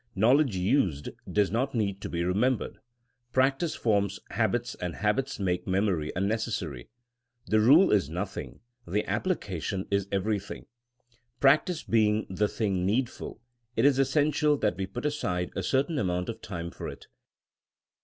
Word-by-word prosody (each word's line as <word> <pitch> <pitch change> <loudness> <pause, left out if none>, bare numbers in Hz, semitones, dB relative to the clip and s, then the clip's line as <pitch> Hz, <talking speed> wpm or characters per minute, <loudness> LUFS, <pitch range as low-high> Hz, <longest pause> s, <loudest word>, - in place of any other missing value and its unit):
Knowledge 125 +3 +4
used 90 - +1 0.2
does 105 -2 +2
not 125 +5 -1
need 100 -3 -1
to - - -5
be 85 0 -1
remembered; 110 +8 0 0.5
practice 135 +5 +2
forms 100 -3 +1
habits - - 0
and 90 -1 -5
habits 105 +6 -1
make 90 -2 -1
memory 95 -5 0
unnecessary. 95 - -2 0.6
The 110 - +2
rule 145 - +6
is 100 -9 +2
noth 90 +4 -4
ing; - - -7 0.3
the 105 +5 -1
application 100 - -2
is 100 -1 +1
everything. 100 +1 -2 0.7
Practice 155 +4 +3
being 110 -1 +2
the 105 +3 +1
thing 100 -4 -1
needful, 115 +2 -2 0.3
it - - +2
is 140 -2 +4
essential 150 +2 +2
that 105 -8 0
we 95 +1 -3
put 120 +8 -6
aside 90 -12 -1
a - - -1
certain 140 - 0
amount 90 -3 -1
of 115 - -6
time 85 -4 -5
for - - -6
it. - - -10
105 Hz, 145 wpm, -28 LUFS, 95-130 Hz, 0.7 s, rule